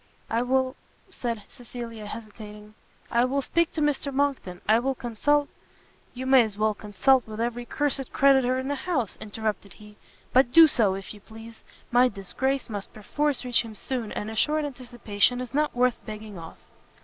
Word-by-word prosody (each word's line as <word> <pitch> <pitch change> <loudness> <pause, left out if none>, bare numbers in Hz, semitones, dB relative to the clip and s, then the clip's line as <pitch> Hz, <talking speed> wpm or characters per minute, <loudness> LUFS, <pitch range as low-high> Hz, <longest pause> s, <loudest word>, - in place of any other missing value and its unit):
"I 230 +1 +2
will, 260 +1 +1 0.2
" - - -35
said 230 -4 -2
Cecilia, 235 -3 -8
hesitating, 210 -1 -9 0.4
"I 235 0 +3
will 270 +2 0
speak 335 +3 +1
to 315 - -2
Mr 295 -1 0
Monckton, 270 -10 -1
I 220 +2 +5
will 265 +2 -1
consult 285 +5 +1 0.4
" - - -34
"You 255 +1 -5
may 265 -1 +7
as 215 -3 -2
well 215 0 +2
consult 220 +6 +2
with 215 0 -7
every 240 +1 -2
cursed 275 -1 -1
creditor 265 -2 +4
in 260 +1 -3
the 285 - 0
house!" 270 - -2
interrupted 210 -2 -4
he; 210 0 -15 0.4
"but 255 -1 +5
do 330 +4 +9
so, 220 -10 +3
if 195 +1 -7
you 210 - -13
please; 225 +2 -13 0.3
my 245 +1 +5
disgrace 260 +7 -2
must 205 -3 -6
perforce 280 +6 -1
reach 245 -1 +2
him 225 -2 -9
soon, 240 0 -4
and 210 +1 -4
a - - -7
short 305 +6 +2
anticipation 245 -4 0
is 250 -2 -6
not 300 -1 +1
worth 250 -1 +1
begging 215 -1 -8
off." 165 -2 -10
240 Hz, 185 wpm, -26 LUFS, 215-265 Hz, 0.4 s, do